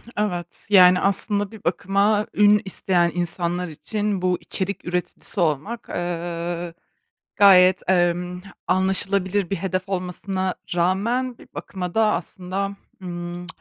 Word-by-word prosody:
Evet, 180 -5 -3
yani, 180 -2 +7
aslında 200 +1 0
bir 220 -3 -12
bakıma 200 +4 +1
ün 210 0 +5
isteyen 175 -2 +1
insanlar 175 0 -2
için, 205 +5 -3
bu 180 -1 +1
içerik 195 +1 -3
üreticisi 180 +3 -3
olmak, 170 - -1
ııı, 175 0 -4 0.6
gayet, 185 -2 +6
emm, 180 0 +1 0.3
anlaşılabilir 190 0 +2
bir 195 - 0
hedef 185 0 -3
olmasına 185 0 -2 0.2
rağmen 230 +8 0
bir - - -16
bakıma 180 -2 -6
da 220 -1 +3
aslında, 190 +3 -4 0.3
ımm, 175 -1 -6
185 Hz, 115 wpm, -23 LUFS, 175-200 Hz, 0.6 s, yani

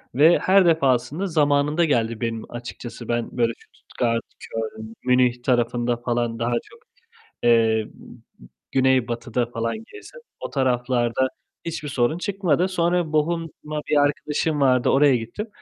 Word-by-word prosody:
Ve 160 +5 +6
her 190 0 +4
defasında 155 +2 +2
zamanında 150 0 +2
geldi 115 -6 0
benim 115 -1 -3
açıkçası, 120 0 -8
ben 120 +1 -2
böyle, 115 -1 +2 0.2
Stuttgart, 115 -1 -2 0.2
Köln, 110 0 -6
Münih 125 -1 +2
tarafında 120 -1 +1
falan 120 -1 -2
daha 120 +1 0
çok, 470 - -18 0.6
eee, 115 -2 +3 0.8
güneybatıda 125 -2 +1
falan 115 - -3 0.2
gezdim, 475 +4 -12 0.2
o - - -5
taraflarda 125 -1 +1 0.4
hiçbir 165 -3 -4
sorun 130 +4 +1
çıkmadı. 185 -3 0
Sonra 175 -3 0
Bochum'a 155 -1 -2
bir 150 - +3
arkadaşım 145 +1 0
vardı, 130 -2 +3
oraya 140 -1 +5
gittim. 120 - -5
130 Hz, 125 wpm, -23 LUFS, 120-155 Hz, 0.8 s, Ve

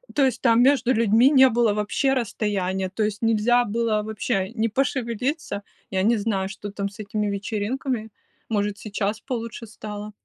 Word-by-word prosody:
то 280 - +4
есть 250 -3 -1
там 230 -2 +4
между 260 -1 +4
людьми 230 +2 +5
не 265 -2 +7
было 235 -3 +2
вообще 210 +6 0
расстояния, 195 -6 -1
то 200 +4 -5
есть 210 +2 -2
нельзя 230 +2 +3
было 225 0 0
вообще 200 -3 -2
ни 225 -1 0
пошевелиться 250 -1 -2 0.3
Я 190 -1 0
не 230 +3 +3
знаю, 200 -3 -1
что 205 +1 -7
там 200 0 -3
с 200 - -17
этими 210 0 -2
вечеринками. 215 +4 -2 0.4
Может, 205 -2 0
сейчас 210 +1 -3
получше 230 -3 -5
стало. 210 -1 -7
220 Hz, 165 wpm, -24 LUFS, 205-240 Hz, 0.4 s, не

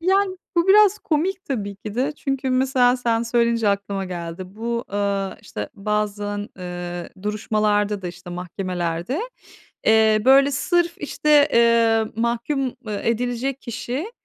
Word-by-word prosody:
Yani 380 +2 +2 0.2
bu 340 +2 +3
biraz 415 0 +6
komik 365 +4 -1
tabii 205 -7 -3
ki 205 +1 -8
de. 265 +5 0
Çünkü 270 -2 -2
mesela 255 -1 +3
sen 235 -2 0
söyleyince 235 -1 +2
aklıma 200 -1 -1
geldi. 175 -1 -6
Bu, 235 +2 -3
aaa, 200 -1 -1
işte, 105 0 -6
bazen, 205 0 -2
eee, 175 -1 -5
duruşmalarda 210 -1 0
da, 180 - -3
işte, 175 +1 -10
mahkemelerde, 180 - -3 0.7
eee, 220 -1 +5
böyle 275 +2 +6
sırf 345 +5 +1
işte, 295 0 +3
eee, 230 -1 +4
mahkûm, 235 +5 -1 0.2
eee, 210 -1 -3
edilecek 245 +3 -1
kişi, 255 - -4
230 Hz, 130 wpm, -22 LUFS, 200-270 Hz, 0.7 s, biraz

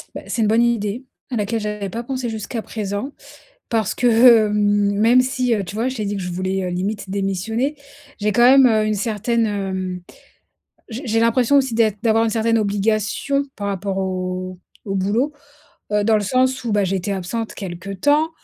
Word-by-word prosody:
Bah, - - -5
c'est 230 - -2
une - - +2
bonne 225 +2 +3
idée, 235 +1 0 0.3
à - - -2
laquelle 215 +2 -1
j'avais 210 -2 -4
pas 230 +5 -5
pensé 255 -1 -3
jusqu'à 220 +1 -4
présent. 210 +5 -4 0.6
Parce 225 -2 0
que 235 -2 +5
même 205 +3 +3
si, 255 -2 0
heu, 200 - -2
tu 195 - -8
vois, 230 +4 0
je 260 - -5
t'ai 215 - -3
dit 205 0 -2
que 190 - -4
je 180 - -4
voulais, 185 +2 -2
heu, 180 - -2
limite 190 +2 -3
démissionner, 200 +8 -2 0.4
j'ai 210 +1 +1
quand 240 +4 +3
même, 265 +1 +7
heu, 215 -2 +3
une 215 - 0
certaine, 225 +2 0
hem, 190 -3 -3 0.9
j'ai 245 +4 -7
j'ai 225 0 +1
l'impression 240 +4 +3
aussi 265 -4 +2
d'être 215 -3 +2
d'avoir 225 0 +3
une 225 - 0
certaine 225 +1 +1
obligation 215 +6 0
par 200 -1 -3
rapport 195 0 -3
au 185 -1 -3 0.3
au 195 - -3
boulot. 210 +10 0 0.6
Heu, 210 0 +2
dans 220 0 +4
le 210 - 0
sens 255 +4 +1
où, 230 - -1
bah, 205 -1 +2
j'étais 190 +1 -2
absente 195 +5 -4
quelque 190 0 -7
temps, 290 - +2
215 Hz, 190 wpm, -20 LUFS, 195-235 Hz, 0.9 s, même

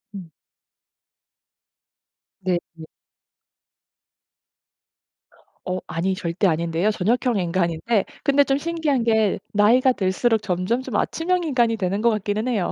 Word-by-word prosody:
음. 185 -4 -9 2.1
네. 180 -1 0 0.2
네. 160 -1 -11 2.8
어, 185 0 -2
아니. 185 +3 -1
절대 180 +2 -1
아닌데요. 170 +4 0
저녁형 230 +3 0
인간인데 175 +4 0 0.2
근데 285 0 +4
좀 275 -1 0
신기한 310 -4 -1
게 220 -4 +2
나이가 235 +6 +4
들수록 215 +3 +1
점점 190 +5 -1
좀 255 -5 -6
아침형 360 +2 0
인간이 240 -6 +1
되는 195 +1 -1
것 235 - +4
같기는 215 +1 -1
해요. 210 -8 -1
210 Hz, 230 characters per minute, -22 LUFS, 185-245 Hz, 2.8 s, 근데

